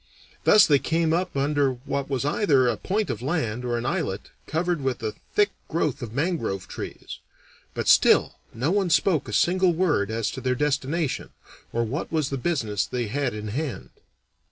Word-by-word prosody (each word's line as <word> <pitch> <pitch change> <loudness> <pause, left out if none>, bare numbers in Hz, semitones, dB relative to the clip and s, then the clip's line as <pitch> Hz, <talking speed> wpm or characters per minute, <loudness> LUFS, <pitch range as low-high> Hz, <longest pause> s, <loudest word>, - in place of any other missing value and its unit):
Thus 210 - +7
they 145 -2 +4
came 160 +4 +1
up 180 -3 -1
under 140 -1 +2
what 135 +2 -4
was 135 -1 -1
either 145 -5 +3
a 120 - +1
point 205 - -1
of - - -5
land 125 -5 -2
or 120 -1 -1
an 120 - -4
islet 140 - -2 0.2
covered 170 0 -1
with 130 -2 -2
a 110 -1 -2 0.2
thick 205 -1 +4 0.2
growth 155 -4 -1
of 120 -3 -5
mangrove 135 - -2
trees. - - -7 0.6
But - - -3
still - - +5
no 130 +8 -1
one 195 -2 +1
spoke 165 -3 +2
a - - -6
single 180 - +3
word 160 - +1
as 110 -1 -1
to 130 - -7
their 125 0 0
destination, 150 +2 -1 0.4
or 115 - 0
what 130 +8 -4
was 155 -4 0
the 135 - -2
business 115 - -1
they 120 -4 -3
had 135 -1 -1
in 105 0 -5
hand. 140 +4 -4
140 Hz, 180 wpm, -25 LUFS, 120-165 Hz, 0.6 s, Thus